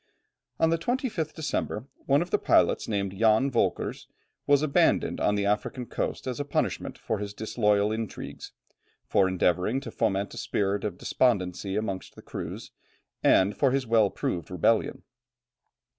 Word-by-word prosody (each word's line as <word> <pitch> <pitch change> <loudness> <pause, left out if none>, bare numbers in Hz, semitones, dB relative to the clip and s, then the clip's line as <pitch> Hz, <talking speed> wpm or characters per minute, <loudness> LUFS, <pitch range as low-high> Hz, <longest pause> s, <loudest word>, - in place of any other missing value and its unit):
On 160 - +3
the 165 - +1
25th 235 - -2
December, 145 -7 -2 0.2
one 140 +4 +4
of 175 - -13
the - - +2
pilots - - +3
named 100 -3 -2
Jan 110 +6 +3
Volkers, 120 - -1 0.4
was 145 0 +4
abandoned 145 -2 +2
on 105 - +2
the 100 -1 0
African 105 +5 -1
coast - - -3
as 130 0 -3
a - - 0
punishment 145 - -2
for 110 - -3
his 105 0 -5
disloyal 105 -1 +1
intrigues, 110 -1 -6 0.5
for 95 - +3
endeavouring 95 +5 +1
to - - -7
foment 100 -3 -1
a - - -6
spirit 100 0 -1
of 100 -4 -3
despondency 95 -5 0
amongst 100 -3 -3
the - - -13
crews, - - -7 0.5
and 100 +3 +4
for 140 - +3
his 135 0 0
well 110 -3 +4
proved 85 -3 -3
rebellion. 90 +5 +1
110 Hz, 155 wpm, -27 LUFS, 100-135 Hz, 0.5 s, one